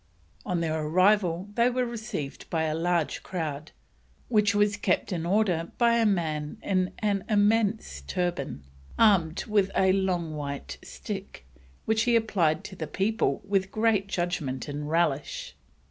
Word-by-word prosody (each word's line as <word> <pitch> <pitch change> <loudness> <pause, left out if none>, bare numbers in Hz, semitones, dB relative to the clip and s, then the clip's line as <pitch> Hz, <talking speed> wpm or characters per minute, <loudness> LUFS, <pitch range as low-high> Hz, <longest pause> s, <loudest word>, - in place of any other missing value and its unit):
On 175 -2 0
their 160 -1 -1
arrival 185 +2 +2
they 235 +3 +3
were 250 0 0
received 220 - -6
by 160 -1 0
a 155 -1 0
large 165 -2 0
crowd, 155 -4 -4 0.6
which 210 -3 +3
was 205 0 +3
kept 195 -1 0
in 170 -1 -2
order 180 -4 +1
by 235 -1 +4
a 225 - +4
man 155 -6 -1
in 185 -2 0
an 200 -3 0
immense 215 +1 +2
turban, 175 - -2 0.3
armed 185 -7 +3
with 205 -3 +2
a 190 0 +4
long 180 -5 0
white 140 -1 -5
stick, 60 - -7 0.4
"which 220 0 +2
he 240 -1 +3
applied 175 -9 +2
to 190 - -8
the 160 -4 -5
people 220 +7 0
with 195 -1 +1
great 215 -2 +1
judgment 160 -9 -2
and 145 +1 -4
relish." 170 - -1
185 Hz, 145 wpm, -27 LUFS, 160-210 Hz, 0.6 s, by